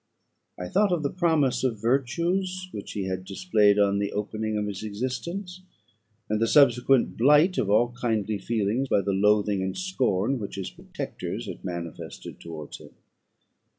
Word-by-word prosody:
I 90 - -5
thought 200 - +2
of 170 -4 0
the 140 - 0
promise 160 -8 +1
of 120 -5 0
virtues 175 - 0
which 100 - -7
he 100 - -2
had 95 0 -3
displayed 100 +2 +2
on 100 -1 +3
the 100 0 -1
opening 110 +1 -2
of 105 - -1
his 100 -2 -5
existence, 130 - -4 0.7
and 110 +1 -1
the 115 - +3
subsequent 125 -1 +4
blight 150 +9 +5
of 100 - 0
all 120 +4 +3
kindly 110 -4 -1
feeling 115 +5 0
by 100 - +3
the 100 +1 -1
loathing 105 0 +2
and 95 0 -3
scorn 130 - 0
which 100 - -6
his 95 -1 -5
protectors - - -6
had - - -8
manifested 85 -3 -7
towards 80 -3 -8
him. - - -15
110 Hz, 160 wpm, -26 LUFS, 100-140 Hz, 0.7 s, blight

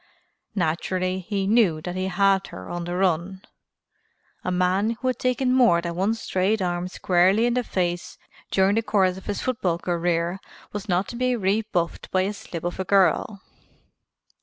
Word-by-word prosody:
Naturally 185 +1 -1
he 195 +1 -2
knew 200 -7 +3
that 180 +3 -5
he 185 0 -1
had 195 +1 +2
her 95 - -9
on 175 0 -4
the 175 +1 -3
run. 185 +1 0 1.0
A - - -2
man 185 +5 +1
who 260 - -2
had 255 - -2
taken 255 0 +1
more 240 -10 +5
than 170 0 -4
one 195 +6 0
straight 205 0 0
arm 175 -1 -1
squarely 185 +4 +2
in 240 - +2
the 250 0 0
face 175 -4 -2 0.3
during 190 +1 +3
the 225 - +2
course 190 -4 +2
of 190 - -11
his 205 - -2
football 195 -10 0
career 170 +1 -1 0.3
was 210 0 -6
not 180 +2 +1
to - - -7
be 255 +1 +1
rebuffed 195 -4 -1
by 185 - +2
a 200 +2 -2
slip 170 -5 -8
of 175 +1 -3
a - - 0
girl. 195 +1 +2
190 Hz, 175 wpm, -24 LUFS, 175-210 Hz, 1.0 s, more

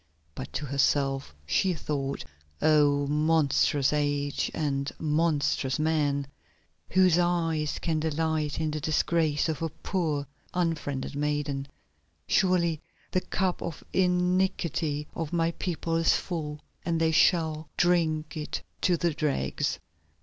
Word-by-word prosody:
But 130 - -7
to 150 - -3
herself 135 - +1
she 180 - +1
thought: 140 - -3 0.3
"Oh! 145 -2 +4
monstrous 150 -1 +2
age, 145 -1 0
and 140 -3 -1
monstrous 150 -3 +1
men, 150 -3 +1 0.6
whose 185 -2 +4
eyes 165 -3 +1
can 160 -2 -1
delight 155 -1 -1
in 155 -1 0
the 155 - -2
disgrace 155 0 +1
of 160 0 -2
a 165 - 0
poor 155 -4 -2 0.3
unfriended 155 -6 -1
maiden. 145 -1 -1 0.6
Surely 170 -4 +2 0.3
the 185 - +1
cup 185 -1 -1
of 165 -3 -5
iniquity 180 -4 +1
of 165 -3 -4
my 165 -1 +2
people 165 -1 -3
is 165 - +4
full, 150 -4 -4 0.2
and 165 -1 0
they 160 0 +3
shall 160 -2 +2
drink 160 -3 +2
it 150 -1 -4 0.2
to 175 -2 +3
the 170 -1 +1
dregs!" 140 - -1
155 Hz, 120 wpm, -28 LUFS, 145-170 Hz, 0.6 s, Oh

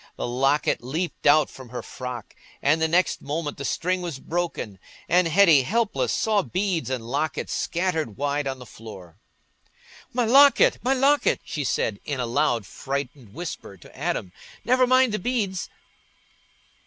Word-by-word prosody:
The - - -4
locket 135 +4 +1
leaped 160 +6 -3
out 150 0 +6
from 130 -2 -12
her 125 - -6
frock, 125 -3 -7 0.3
and 155 +3 +2
the 160 - +3
next 175 +3 +1
moment 150 +1 -4
the 140 - -6
string 185 +5 -1
was 170 -6 -4
broken, 160 - -4 0.3
and 180 0 +3
Hetty, 165 -4 +6
helpless, 220 - 0
saw 215 -2 +2
beads 185 -5 -2
and 125 -3 -3
locket 145 +4 -2
scattered 160 - -1
wide 145 0 -1
on 135 0 -3
the 125 - -11
floor. 95 -8 -12 0.9
"My 245 -1 +1
locket, 275 +4 +6
my 260 +2 +1
locket!" 280 +2 +3
she 150 - -3
said, 110 -5 -1
in 140 -3 -4
a 125 - 0
loud 120 -3 +1
frightened 135 -2 -6
whisper 160 - -7
to - - -17
Adam; 90 - -3 0.3
"never 255 +1 +4
mind 255 -1 +4
the 215 - -1
beads." 200 -4 -2
155 Hz, 155 wpm, -24 LUFS, 130-185 Hz, 0.9 s, out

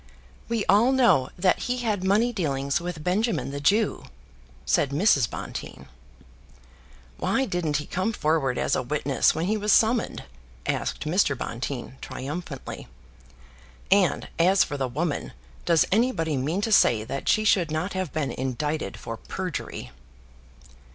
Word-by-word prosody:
"We 230 -3 0
all 215 +7 +4
know 240 - +4
that 180 +1 +2
he 250 - 0
had 215 -6 -1
money 215 +6 +2
dealings 140 -6 -1
with 170 -3 -5
Benjamin, 205 - 0
the 140 0 -5
Jew," 205 +8 +2 0.6
said 140 - +2
Mrs. 140 - +3
Bonteen. 65 - -7 1.3
"Why 270 - +1
didn't 175 - -1
he 150 - -4
come 185 +5 -1
forward 150 - 0
as - - +1
a - - 0
witness 140 +1 +1
when 160 +2 -1
he 215 +3 +1
was 210 0 0
summoned?" 225 +3 +2 0.4
asked - - -2
Mr. 155 -4 +2
Bonteen 125 +2 -5
triumphantly. 145 +1 -6 1.0
"And 195 -2 +3
as 185 +3 +5
for 145 - -5
the 135 -2 -1
woman, 150 +5 -3 0.3
does 160 -6 +4
anybody 195 - +1
mean 150 +9 -1
to 225 - -1
say 115 - +5
that 130 +4 -4
she 215 - +3
should 185 -6 +3
not 155 +5 -2
have 185 -5 -3
been 150 -2 -2
indicted 135 -1 -3
for 115 - -6
perjury?" 175 - -5
165 Hz, 145 wpm, -25 LUFS, 140-205 Hz, 1.3 s, as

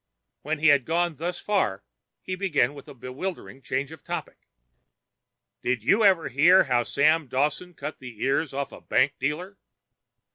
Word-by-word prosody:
When 155 +2 -2
he 160 +2 +4
had 140 -2 +5
gone 170 0 0
thus 175 +2 -3
far 105 - 0 0.4
he 185 - -3
began 160 -9 +1
with 140 -2 -12
a - - -11
bewildering 135 +3 -6
change 135 +3 -3
of 160 - -12
topic. - - -6 1.1
"Did 120 -3 -1
you 200 - +3
ever 185 -7 +4
hear 165 +9 +5
how 125 -1 +1
Dawson 150 +3 +2
Sam 150 +7 -1
cut 155 - -6
the 125 -4 -10
ears 135 +2 +1
off 140 +1 -4
a - - -12
bank 140 - +2
dealer?" 160 +9 -3
150 Hz, 160 wpm, -26 LUFS, 135-175 Hz, 1.1 s, had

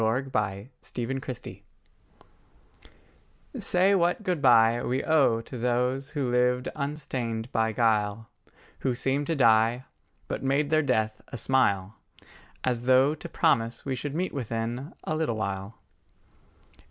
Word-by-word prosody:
LIII 115 +4 +1
THE 135 - -11 0.5
FAITHFUL 120 +1 -4
DEPARTED 130 -2 -7 2.0
SAY 185 +2 +3
what 180 +2 +1
good 180 -6 -1
bye 120 -2 +5
We 130 +2 -1
owe 140 -8 +3
to 125 +2 -9
those 125 +3 0
who 130 -4 0
lived 125 +1 +2
unstained 130 -6 -4
by 110 0 +1
guile, 110 -1 +1 0.5
Who 130 -2 -1
seemed 135 +3 -1
to 165 - 0
die, 115 -1 +3 0.4
But - - -4
made 140 +2 0
their 155 0 +4
death 110 -6 0
a - - -7
smile, 105 -7 +1 0.7
As 125 -1 -1
though 130 +3 +5
to 165 +2 -9
promise 115 -9 +1
we 135 - -1
should 140 +3 -4
meet 180 +3 -2
within 120 +2 -4
A 155 - -2
little 155 -7 -1
while. 100 0 -4
125 Hz, 135 wpm, -27 LUFS, 115-140 Hz, 2.0 s, bye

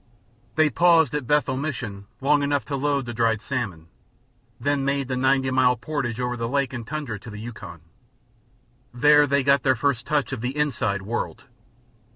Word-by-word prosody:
They 155 -1 +3
paused 165 +2 +4
at 145 -5 -3
Bethel 145 -3 +2
Mission 120 -9 -5
long 145 +2 +3
enough 145 0 0
to 140 - -3
load 140 -1 0
with 120 -1 -6
dried 115 -1 +2
salmon, 105 -10 -4 0.7
then 145 -1 0
made 140 -1 0
the 130 - -2
ninety 130 0 +2
mile 130 -1 +4
portage 120 -1 -3
over 125 0 -1
lake 135 +2 0
and 120 -3 -6
tundra 145 -8 -4
to 115 - -11
the 105 - -8
Yukon. 105 -7 -9 1.1
There 150 +4 +5
they 140 0 +2
got 140 0 +4
their 130 -1 +3
first 120 -1 -1
touch 150 -3 0
of 125 - -4
the 125 +4 -3
"inside" 110 -9 0
world. 115 +5 -4
130 Hz, 175 wpm, -24 LUFS, 120-145 Hz, 1.1 s, There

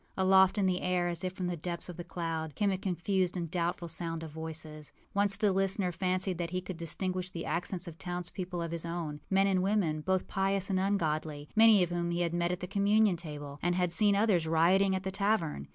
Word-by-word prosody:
Aloft 190 +1 +5
in 200 - +2
the 185 -1 +1
air, 180 -1 +1
as 175 +1 -5
if 185 - -1
from 185 -1 -4
the 175 0 -1
depths 170 +1 -5
of 180 - -7
the 175 - -6
cloud, 165 -3 -4
came 205 -2 +1
a 190 - -1
confused 185 0 0
and 170 -3 -4
doubtful 175 0 -1
sound 165 0 -1
of 160 - -7
voices. 155 -1 -7 0.2
Once 200 0 +2
the 210 0 +2
listener 195 -1 +1
fancied 185 0 -1
that 170 -1 -2
he 185 +1 -2
could 185 0 -6
distinguish 185 +2 -2
the 170 -2 -6
accents 180 0 -2
of 165 -1 -9
towns 180 -1 -4
people 180 -2 -4
of 165 - -4
his 170 -1 -2
own, 165 -3 -4
men 195 0 +3
and 190 -2 +2
women, 185 -6 +1
both 190 +3 0
pious 195 0 0
and 185 - +2
ungodly, 155 -6 -1
many 220 -3 +7
of 175 - -2
whom 175 0 -1
he 170 0 -1
had 170 -1 0
met 175 0 0
at 180 - -3
the - - -2
communion 205 0 +3
table, 145 -4 -7
and 175 0 +1
had 180 -1 +1
seen 205 +3 +4
others 200 -6 +2
rioting 185 +4 +3
at 190 - -3
the 190 - -3
tavern. 195 - 0
180 Hz, 230 wpm, -31 LUFS, 165-190 Hz, 0.2 s, many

